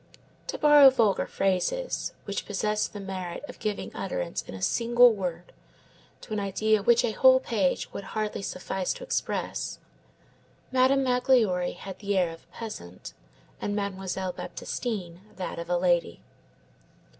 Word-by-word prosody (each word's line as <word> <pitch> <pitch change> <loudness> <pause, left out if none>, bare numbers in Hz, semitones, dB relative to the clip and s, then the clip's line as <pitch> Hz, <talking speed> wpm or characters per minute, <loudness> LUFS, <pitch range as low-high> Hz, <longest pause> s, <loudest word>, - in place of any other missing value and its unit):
To - - -3
borrow 295 -2 +8
vulgar 230 -6 +2
phrases, 195 - -1
which 200 - -4
possess 210 +1 0
the 205 - -9
merit 185 -1 -5
of - - -11
giving 210 -2 -3
utterance - - -3
in - - -10
a - - -7
single 240 0 +5
word 180 -4 -5 0.7
to 215 - -8
an 210 - 0
idea 210 +2 +1
which 235 +3 +4
a 230 - 0
whole 260 +3 +6
page 210 -8 -1
would - - -5
hardly 215 -1 -2
suffice 185 -1 -3
to - - -9
express, - - -2 0.9
Madame 260 +1 +4
Magloire 250 -8 +2
had 190 0 -8
the 200 -1 -1
air 180 -3 +2
of 165 - -13
a - - -19
peasant, 150 - -8 0.5
and 205 - -2
Mademoiselle 190 -2 -3
Baptistine 185 -8 -5
that 185 -2 -5
of 170 0 -6
a 175 - +2
lady. 175 - +1
205 Hz, 145 wpm, -27 LUFS, 185-240 Hz, 0.9 s, borrow